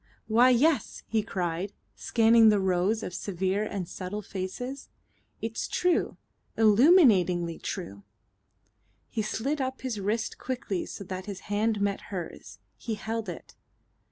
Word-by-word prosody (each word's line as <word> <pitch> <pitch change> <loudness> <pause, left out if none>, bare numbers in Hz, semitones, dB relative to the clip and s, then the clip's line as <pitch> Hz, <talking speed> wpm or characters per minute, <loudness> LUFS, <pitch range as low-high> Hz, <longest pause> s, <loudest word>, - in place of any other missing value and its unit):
"Why, 235 +3 +5
yes," 280 +5 +2
he 220 -1 0
cried, 185 -3 -3 0.2
scanning 225 -1 +5
the 210 -1 +4
rows 190 +4 +1
of 180 - -5
severe 190 +2 -1
and 195 -4 -4
subtle 200 +4 -5
faces. 210 +9 -5 0.5
"It's 225 0 -3
true. 355 -1 +1 0.4
Illuminatingly 210 - +5
true." 100 - -5 1.1
He 220 - -1
slid 270 +7 -2
up 260 0 -3
his 250 -5 -3
wrist 215 +3 -2
quickly 245 -8 -3
so - - -7
that 185 0 -6
his 200 -2 -6
hand 215 0 +1
met 200 -1 0
hers; 180 -4 -7 0.2
he 225 - -4
held 220 0 -4
it. 175 - -9
210 Hz, 130 wpm, -28 LUFS, 185-230 Hz, 1.1 s, Why